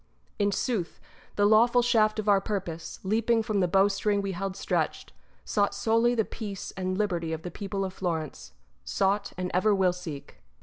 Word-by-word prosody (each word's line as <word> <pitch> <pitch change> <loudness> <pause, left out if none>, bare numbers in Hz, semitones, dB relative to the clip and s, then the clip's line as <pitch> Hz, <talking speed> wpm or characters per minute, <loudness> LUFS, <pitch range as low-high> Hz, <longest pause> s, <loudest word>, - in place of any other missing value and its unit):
In 205 0 +2
sooth, 200 -4 -2 0.4
the 205 - +3
lawful 235 +3 +5
shaft 220 -3 +3
of 215 -1 -3
our 200 -1 +5
purpose, 185 -6 -4
leaping 225 +3 +2
from 215 -3 -1
the 180 - +3
bowstring 200 +2 +2
we 195 -1 -2
held 190 +1 -4
stretched, - - -2 0.3
sought 200 -1 +1
solely 230 +4 +2
the 220 -2 +1
peace 205 -4 -6
and 185 0 -2
liberty 175 -6 -1
of 160 0 -5
the 180 - -5
people 195 +1 -3
of 190 - -5
Florence 165 -6 -4 0.2
— - - -40
sought, 200 +1 0
and 180 0 -3
ever 200 +3 +3
will 185 -2 +3
seek. 165 -6 -9
200 Hz, 180 wpm, -28 LUFS, 185-215 Hz, 0.4 s, lawful